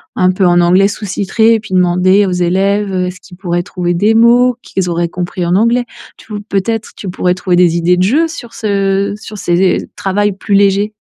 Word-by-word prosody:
un 185 0 +2
peu 185 0 0
en 175 0 +4
anglais 185 +3 +3
sous-titré? 210 +2 0
et 225 - -1
puis 205 -3 -10
demander 185 +2 +3
aux - - -2
élèves, 195 +3 0
heu, 185 -1 -1
est-ce 180 0 -8
qu'ils 180 -2 -15
pourraient 175 -3 -2
trouver 175 -1 -3
des 210 +5 +2
mots, 240 +2 +4
qu'ils 185 -2 -3
auraient 170 0 -1
compris 180 +1 -4
en 175 - +1
anglais? 235 +4 +2 0.3
Tou 210 -2 -8
peut-être, 215 +3 -2
tu 195 - -7
pourrais 180 0 0
trouver 185 -1 -1
des 175 -1 +3
idées 175 +1 +2
de 180 - +2
jeux 290 - +2
sur 245 -8 -10
ce 200 -1 -1
sur 215 -1 -10
ces 180 +1 0
travails 205 +1 -1
plus 200 +1 -4
légers. 200 +1 +2
195 Hz, 205 wpm, -13 LUFS, 180-210 Hz, 0.3 s, en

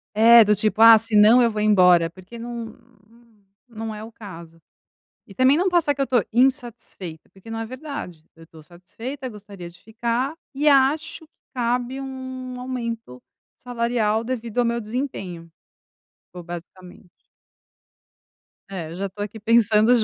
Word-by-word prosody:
É, 230 +2 +8
do 210 0 +3
tipo, 215 +1 +1
"Ah, 230 0 +10
senão 220 +2 +5
eu 235 - +4
vou 215 - -4
embora", 180 -5 +4
porque 185 +6 -13
não 235 -1 -7 0.9
não 225 -1 -7
é 210 - -8
o 225 - -10
caso. 170 -7 -12 0.7
E 195 - -14
também 260 +7 +4
não 370 +2 +2
passar 340 -5 +2
que 280 - -9
eu - - +3
estou 245 -6 +1
insatisfeita, 235 - -2
porque 195 +4 -14
não 225 - -4
é 225 - -4
verdade. 255 - -8
Eu 165 - -16
estou 160 -1 -16
satisfeita, 230 - -8
gostaria 200 -5 -11
de 170 +1 -17
ficar 235 +5 -2 0.2
e 290 +3 -2
acho 300 +4 +2
que - - -56 0.2
cabe 245 +1 -2
um 260 -1 -7
aumento 235 - -6 0.3
salarial, 235 -2 -1
devido 235 -2 -5
ao 245 - +4
meu 235 0 -1
desempenho, 210 -8 -6 0.8
ou 180 -1 -9
basicamente. 180 +2 -11 1.6
É, 185 -5 -6
eu - - -8
já 195 +2 -3
estou 205 +2 -7
aqui 210 +2 -8
pensando 220 0 +3
225 Hz, 155 wpm, -22 LUFS, 195-250 Hz, 1.6 s, Ah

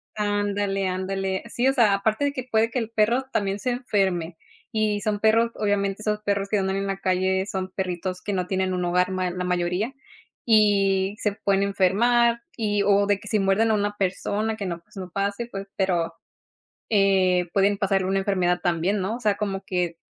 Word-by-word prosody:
Ándale, 205 -2 -1
ándale. 190 +1 -2
Sí, 245 +2 0
o 270 - +3
sea, 230 -7 +4
aparte 215 +6 +1
de 285 - 0
que 255 -3 -5
puede 225 +1 +2
que 255 - -1
el 225 -2 -3
perro 230 +4 +1
también 200 -1 -1
se 250 - -1
enferme. 190 -9 -1 0.3
Y 215 -2 0
son 210 -1 -1
perros, 225 +2 +3
obviamente, 200 -1 -1
esos 210 0 -1
perros 200 -1 -1
que 210 - +1
andan 190 -1 0
en 195 0 -2
la 195 - -2
calle, 190 0 0
son 190 -2 -4
perritos 185 -1 -3
que 205 - -3
no 180 -2 -1
tienen 190 0 0
un 180 -1 -1
hogar 180 +1 +1
ma 185 -1 -1
la 180 0 -4
mayoría, 180 +7 -1 0.5
y 200 -3 +3
se 210 - 0
pueden 195 -1 +1
enfermar 230 +5 +3 0.2
y 205 -3 0
o 200 0 +4
de 200 -1 +1
que 215 - -12
si 215 - +1
muerden 195 +3 +2
a - - +3
una 205 0 0
persona 205 +3 -1
que 205 -2 -5
no, 170 -2 -4
pues, - - -25
no 185 -1 -6
pase, 200 +5 -2
pues, 195 0 -6
pero, 175 -4 0 0.8
eh, 190 -4 +3
pueden 200 0 +3
pasarle 195 -1 +1
una 195 +1 +1
enfermedad 180 -3 +1
también, 175 +4 0
¿no?, 200 +5 -2
o - - -7
sea, 210 -4 +1
como 195 -2 -3
que 175 -3 -2
195 Hz, 200 wpm, -24 LUFS, 190-210 Hz, 0.8 s, sea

